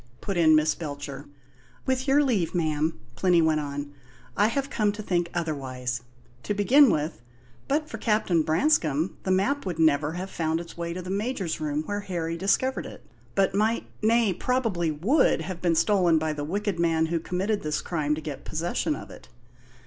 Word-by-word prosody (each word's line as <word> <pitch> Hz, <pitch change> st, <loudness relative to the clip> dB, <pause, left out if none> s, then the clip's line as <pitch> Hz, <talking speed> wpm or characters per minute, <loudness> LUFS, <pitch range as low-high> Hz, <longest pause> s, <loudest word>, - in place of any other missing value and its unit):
put 195 Hz, -, -3 dB
in 160 Hz, -2 st, +5 dB
Miss 155 Hz, 0 st, +3 dB
Belcher. 145 Hz, -3 st, -6 dB, 0.6 s
"With 260 Hz, +1 st, 0 dB
your 285 Hz, +2 st, +5 dB
leave, 205 Hz, -, 0 dB
ma'am," 155 Hz, -4 st, 0 dB, 0.2 s
Plinny 180 Hz, -2 st, +3 dB
went 160 Hz, -1 st, +3 dB
on, 145 Hz, 0 st, -5 dB, 0.4 s
"I 205 Hz, -, +4 dB
have 275 Hz, +4 st, -2 dB
come 210 Hz, -2 st, +1 dB
to 215 Hz, +1 st, -7 dB
think 175 Hz, -3 st, 0 dB
otherwise. 130 Hz, -7 st, -3 dB, 0.4 s
To 205 Hz, -, -2 dB
begin 255 Hz, +7 st, +6 dB
with, 150 Hz, -, -1 dB, 0.5 s
but 300 Hz, +2 st, 0 dB
for -, -, -7 dB
Captain 210 Hz, -7 st, +2 dB
Branscome 160 Hz, -, +1 dB
the -, -, -4 dB
map 200 Hz, +10 st, +1 dB
would 180 Hz, -4 st, -4 dB
never 155 Hz, -1 st, +3 dB
have 185 Hz, +2 st, -5 dB
found 160 Hz, 0 st, -1 dB
its 170 Hz, 0 st, -9 dB
way 170 Hz, 0 st, -4 dB
to 180 Hz, +1 st, -6 dB
the 185 Hz, -, -5 dB
Major's 200 Hz, -5 st, -2 dB
room, 150 Hz, 0 st, -1 dB
where 205 Hz, +5 st, -3 dB
Harry 170 Hz, -4 st, -3 dB
discovered 200 Hz, +9 st, 0 dB
it; -, -, -12 dB, 0.3 s
but 195 Hz, -1 st, +2 dB
might 215 Hz, +3 st, +1 dB, 0.2 s
nay, 225 Hz, -2 st, +3 dB
probably 210 Hz, -5 st, 0 dB
would 170 Hz, -, +2 dB
have 175 Hz, +2 st, -6 dB
been 170 Hz, -2 st, +2 dB
stolen 180 Hz, -3 st, +3 dB
by 155 Hz, 0 st, 0 dB
the 145 Hz, -1 st, -4 dB
wicked 195 Hz, +3 st, -2 dB
man 165 Hz, -1 st, +2 dB
who 170 Hz, -, +2 dB
committed 190 Hz, +5 st, -1 dB
this 150 Hz, 0 st, -1 dB
crime 150 Hz, -3 st, -1 dB
to 155 Hz, -, -6 dB
get 150 Hz, -3 st, -6 dB
possession 170 Hz, -, -1 dB
of -, -, -9 dB
it. -, -, -14 dB
175 Hz, 185 wpm, -26 LUFS, 155-205 Hz, 0.6 s, begin